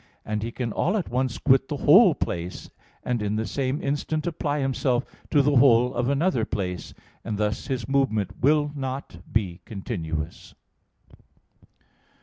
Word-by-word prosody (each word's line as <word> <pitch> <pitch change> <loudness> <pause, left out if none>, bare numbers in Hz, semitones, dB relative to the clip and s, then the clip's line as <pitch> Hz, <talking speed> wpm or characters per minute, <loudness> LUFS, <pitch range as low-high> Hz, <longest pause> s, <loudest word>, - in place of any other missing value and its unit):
And 105 0 -2
he 115 +2 -3
can 115 -3 -3
all 190 +6 +1
at 190 - -3
once 125 0 -1
quit 135 -1 +3
the 145 - -3
whole 165 - +6
place, 85 +1 -4 0.3
and 120 -3 -1
in 105 0 -1
the 110 +1 -1
same 135 +3 -1
instant 145 +2 -1
apply 155 -4 -1
himself 130 -1 0 0.2
to 145 -3 +4
the 145 -1 +3
whole 125 -1 +5
of 120 +1 0
another 140 -3 +1
place, 90 -5 -4 0.3
and 110 -3 -3
thus 105 0 -1
his 130 -3 -3
movement 120 -9 +1
will 145 +2 +3
not 135 -8 -5
be 95 -5 -1
continuous. 85 - -5
130 Hz, 150 wpm, -25 LUFS, 105-140 Hz, 0.3 s, whole